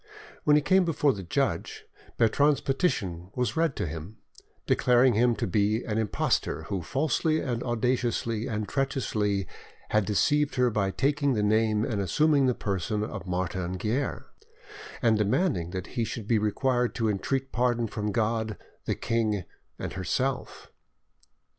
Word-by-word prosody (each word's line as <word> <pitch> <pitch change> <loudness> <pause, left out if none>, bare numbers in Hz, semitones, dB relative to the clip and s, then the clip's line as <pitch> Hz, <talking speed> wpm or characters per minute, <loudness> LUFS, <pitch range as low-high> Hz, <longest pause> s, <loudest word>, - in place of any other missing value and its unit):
When 150 - +6
he 150 - +3
came 190 +3 +4
before 150 -4 +2
the 100 - -6
judge, 85 - -2 0.3
Bertrande's 140 +6 +3
petition 95 - -1
was 125 +4 -1
read 165 -4 +1
to - - -2
him, 80 +6 -7 0.5
declaring 125 0 +4
him 120 +2 +3
to - - -2
be 105 +4 +1
"an 110 -1 -1
impostor, 110 -3 0
who 95 -3 -3
falsely, 155 - 0
audaciously, 120 -2 -1
and 105 -4 -3
treacherously 105 - -1 0.4
had 105 -2 +2
deceived 145 +8 +2
her 125 -1 +3
by 100 -2 +1
taking 140 +5 +1
the 105 -3 0
name 110 0 +2
and 105 -3 -1
assuming 140 - +3
the 125 - +2
person 100 +1 -2
of 100 - -6
Martin 90 0 -2
Guerre," 120 +9 -2 0.8
and 110 -2 +4
demanding 105 - +1
that 95 0 -4
he 120 - 0
should 110 -1 -5
be 115 -2 +3
required 125 +3 0
to 115 -3 0
entreat 130 +6 -1
pardon 120 -1 +1
from 105 -1 -3
God, 110 -1 -1 0.3
the - - 0
king, 110 -4 0 0.3
and - - -5
herself. 125 +8 -2
115 Hz, 145 wpm, -27 LUFS, 105-130 Hz, 0.8 s, When